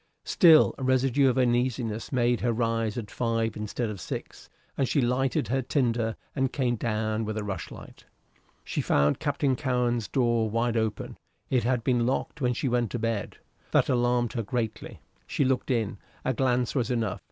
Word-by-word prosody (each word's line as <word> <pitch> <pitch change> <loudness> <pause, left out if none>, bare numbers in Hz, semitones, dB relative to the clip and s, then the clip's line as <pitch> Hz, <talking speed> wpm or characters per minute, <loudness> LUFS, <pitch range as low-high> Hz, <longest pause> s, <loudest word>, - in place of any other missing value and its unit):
Still 160 -4 +6
a - - -4
residue 130 +1 +3
of 130 - 0
uneasiness 120 -3 0
made 120 -2 +1
her 120 - +1
rise 115 -1 -1
at 105 -4 -5
five 115 -2 -1
instead 105 +3 -3
of 105 -4 -6
six, - - -7 0.3
and 135 - 0
she 145 - +2
lighted 125 -2 0
her 135 +2 +1
tinder 120 -4 0 0.2
and 135 -2 0
came 125 -3 0
down 110 -1 -1
with 110 0 -3
a 110 - -2
rushlight. 100 -4 -7 0.6
She - - -2
found 70 +1 +2
Captain 140 -3 0
Cowen's 120 -4 0
door 120 -3 +1
wide 115 +2 0
open; 110 -2 -2 0.3
it 125 -4 +2
had 125 -2 +1
been 120 -2 +2
locked 135 +3 -2
when 125 -1 +2
she 135 - -1
went 120 -2 +1
to - - 0
bed. 115 -2 -2 0.3
That - - +2
alarmed 120 -1 +1
her 115 - -1
greatly. 110 0 -4 0.3
She 140 - 0
looked 130 +1 0
in. 110 -5 -1 0.3
A 130 - +1
glance 125 -1 +1
was 125 -5 0
enough. 115 -5 -1
120 Hz, 175 wpm, -27 LUFS, 115-130 Hz, 0.6 s, Still